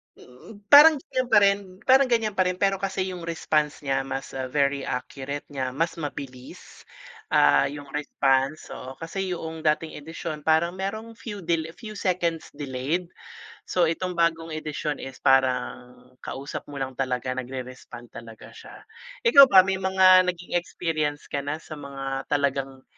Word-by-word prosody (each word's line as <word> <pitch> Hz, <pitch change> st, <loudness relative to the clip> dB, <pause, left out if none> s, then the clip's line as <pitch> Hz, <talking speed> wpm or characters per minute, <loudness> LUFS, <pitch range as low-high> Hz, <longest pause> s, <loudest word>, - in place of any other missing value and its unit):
hmm, 200 Hz, -, -15 dB
parang 300 Hz, +2 st, +10 dB
gan'yan 255 Hz, -2 st, -3 dB
pa -, -, +5 dB
rin 200 Hz, 0 st, +5 dB, 0.3 s
parang 265 Hz, +1 st, +5 dB
gan'yan 225 Hz, -3 st, +1 dB
pa 185 Hz, -2 st, +1 dB
rin 180 Hz, -, -1 dB
pero 195 Hz, 0 st, +1 dB
kasi 190 Hz, -1 st, -2 dB
yung 175 Hz, -2 st, -8 dB
response 155 Hz, -3 st, -1 dB
niya 135 Hz, -1 st, 0 dB
mas 135 Hz, 0 st, -5 dB, 0.2 s
very 140 Hz, 0 st, 0 dB
accurate 135 Hz, +3 st, -5 dB
niya 130 Hz, -2 st, -3 dB
mas 165 Hz, +2 st, -1 dB
mabilis, 135 Hz, -4 st, -9 dB, 0.4 s
ah, 105 Hz, -, +4 dB
yung 140 Hz, 0 st, -9 dB
response, 135 Hz, -1 st, 0 dB
oo 130 Hz, +1 st, -8 dB
kasi 180 Hz, +4 st, -4 dB
yung 160 Hz, -1 st, -6 dB
dating 155 Hz, +1 st, 0 dB
edisyon 155 Hz, 0 st, -6 dB
parang 160 Hz, +3 st, +2 dB
merong 220 Hz, +5 st, -6 dB
few 205 Hz, -7 st, -7 dB
del 165 Hz, -1 st, 0 dB
few 215 Hz, -3 st, -9 dB
seconds 170 Hz, -3 st, -1 dB
delayed. 145 Hz, +5 st, -3 dB, 0.5 s
So, 175 Hz, -2 st, +1 dB
itong 175 Hz, +2 st, -3 dB
bagong 165 Hz, -1 st, +1 dB
edisyon 155 Hz, -1 st, -4 dB
is 135 Hz, 0 st, -8 dB
parang 130 Hz, -2 st, +1 dB, 0.2 s
kausap 135 Hz, +2 st, -7 dB
mo 145 Hz, -, -10 dB
lang 135 Hz, -1 st, -3 dB
talaga 130 Hz, -1 st, -1 dB
nagre-respond 125 Hz, -1 st, -7 dB
talaga 115 Hz, -1 st, -11 dB
siya. -, -, -13 dB, 0.4 s
Ikaw 280 Hz, -, +9 dB
ba 190 Hz, -6 st, +7 dB
may 190 Hz, 0 st, -1 dB
mga 185 Hz, -1 st, +5 dB
naging 175 Hz, 0 st, -1 dB
experience 155 Hz, -4 st, -3 dB
ka 140 Hz, -, -1 dB
na 145 Hz, +2 st, -3 dB
sa 155 Hz, -1 st, -10 dB
mga 135 Hz, -1 st, -5 dB
talagang, 135 Hz, -2 st, -1 dB
155 Hz, 155 wpm, -25 LUFS, 135-185 Hz, 0.5 s, parang